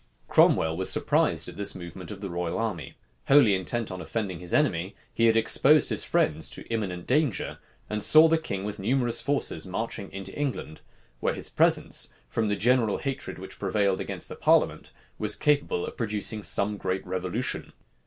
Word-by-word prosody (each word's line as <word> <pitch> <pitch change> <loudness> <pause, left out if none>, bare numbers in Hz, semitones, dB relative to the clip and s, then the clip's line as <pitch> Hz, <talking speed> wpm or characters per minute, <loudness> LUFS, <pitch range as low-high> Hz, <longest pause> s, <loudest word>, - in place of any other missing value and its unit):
Cromwell 80 0 +4
was 95 +2 +1
surprised - - +2
at - - -9
this 100 -1 -2
movement 90 -1 -9
of 105 -1 -8
the 100 - -5
royal 85 -1 -3
army. 100 - -4 0.3
Wholly 135 -7 +6
intent 105 +4 -2
on 95 0 -6
offending 100 -7 -4
his 90 -1 -5
enemy, 95 - +1 0.2
he 115 - +3
had 115 0 +4
exposed 130 +6 +4
his - - +2
friends 80 +1 0
to - - -5
imminent 100 -6 -3
danger, 140 - 0 0.3
and 105 0 -3
saw 155 +8 +8
the 165 0 +2
king 100 -11 -5
with 105 0 -5
numerous 120 +2 +1
forces 140 - -1
marching 100 +1 -5
into 95 0 -6
England; 135 - -4 0.4
where - - 0
his - - -6
presence, - - +2 0.2
from 110 -1 -1
the 105 - 0
general 115 0 +2
hatred 135 -1 -4
which 95 +1 -10
prevailed 100 -1 0
against - - -5
the - - -8
parliament, - - +2 0.3
was - - -1
capable 145 -11 +1
of - - -8
producing 105 -1 -2
some 105 0 +1
great 95 0 -3
revolution. 95 +6 -2
105 Hz, 175 wpm, -27 LUFS, 95-120 Hz, 0.4 s, saw